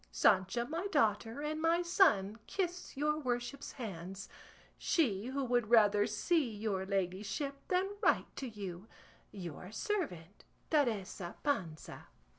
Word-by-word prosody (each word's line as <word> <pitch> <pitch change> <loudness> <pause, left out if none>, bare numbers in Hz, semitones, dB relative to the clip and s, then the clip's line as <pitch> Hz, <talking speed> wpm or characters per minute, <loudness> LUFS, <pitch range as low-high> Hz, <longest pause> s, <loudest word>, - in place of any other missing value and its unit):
Sancha 195 +4 +3
my 330 +8 -3
daughter, 225 - +1
and 310 +1 -2
my 335 +2 +3
son, 255 - +3
kiss 360 -5 -3
your 300 +2 +1
worship's 250 0 -3
hands. 195 -5 -6 0.5
She 230 - +1
who 270 +1 -1
would 240 -3 +1
rather 210 -2 +5
see 275 - +1
your 205 -3 -2
ladyship 195 +9 -2
than 370 +1 +2
write - - +2
to 265 - -4
you, 200 -2 -7 0.4
Your 180 -1 -7
servant, 215 - -3 0.3
TERESA 210 - 0
PANZA. 180 - -2
230 Hz, 120 wpm, -34 LUFS, 195-300 Hz, 0.5 s, rather